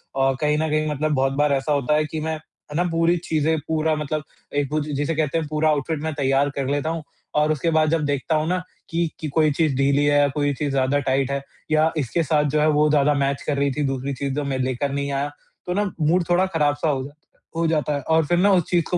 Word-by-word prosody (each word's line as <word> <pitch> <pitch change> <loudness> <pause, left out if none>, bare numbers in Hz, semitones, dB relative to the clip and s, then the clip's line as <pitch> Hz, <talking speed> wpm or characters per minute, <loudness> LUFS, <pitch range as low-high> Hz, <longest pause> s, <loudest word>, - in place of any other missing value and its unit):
औ 135 0 +2
कहीं 150 0 +2
न 160 +1 0
कहीं 155 0 +1
मतलब 150 +1 -1
बहुत 135 0 +1
बार 145 +1 +2
ऐसा 135 +2 -1
होता 145 0 +1
है 155 0 +2
कि 155 +1 -5
मैं, 160 +1 -2
है 155 -1 -14
ना 175 - +2
पूरी 165 +1 +2
चीज़ें 160 -1 0
पूरा 160 0 +1
मतलब 150 0 -3 0.4
एक 140 -2 -1
वो 155 - +1
जि 150 0 -5
जिसे 145 +3 -1
कहते 155 0 0
हैं 160 - -2
पूरा 155 +1 +1
आउटफ़िट 150 +1 -1
मैं 160 0 -2
तैयार 140 0 +1
कर 135 -2 -2
लेता 145 +2 0
हूँ 165 -1 -3 0.3
और 150 +1 +3
उसके 155 +2 0
बाद 155 -1 +3
जब 160 -2 +1
देखता 145 +2 0
हूँ 155 +1 0
ना 180 0 0 0.3
कि, 165 0 0
कि 155 - -4
कोई 155 +1 +2
चीज़ 150 -1 +1
ढीली 140 +1 +3
है 145 0 +4
या 145 - +4
कोई 145 -1 +1
चीज़ 145 +1 -2
ज़्यादा 135 +1 +1
टाइट 135 0 0
है 140 0 -2 0.3
या 155 +1 +3
इसके 155 +4 0
साथ 150 0 +2
जो 150 - +1
है 155 - +3
वो 150 - +4
ज़्यादा 150 0 +3
मैच 140 -1 0
कर 145 - 0
रही 140 0 +1
थी 150 - +1
दूसरी 135 +1 -2
चीज़ 135 +1 -3
जो 150 - -1
मैं 135 -1 -2
लेकर 130 +2 -1
नहीं 140 0 -2
आया 140 +1 -1 0.3
तो 180 - -2
ना 205 0 0
मूड 170 +4 +3
थोड़ा 180 +2 +3
ख़राब 155 -6 +1
सा 150 +2 -1
हो 135 -3 0
जाता 145 +3 -11 0.4
हो 165 - 0
जाता 150 -2 0
है 140 - -2
और 160 -1 +3
फिर 175 +3 +1
न 185 - +3
उस 190 -3 +4
चीज़ 175 -2 +2
को 180 - +1
150 Hz, 270 wpm, -22 LUFS, 140-160 Hz, 0.4 s, है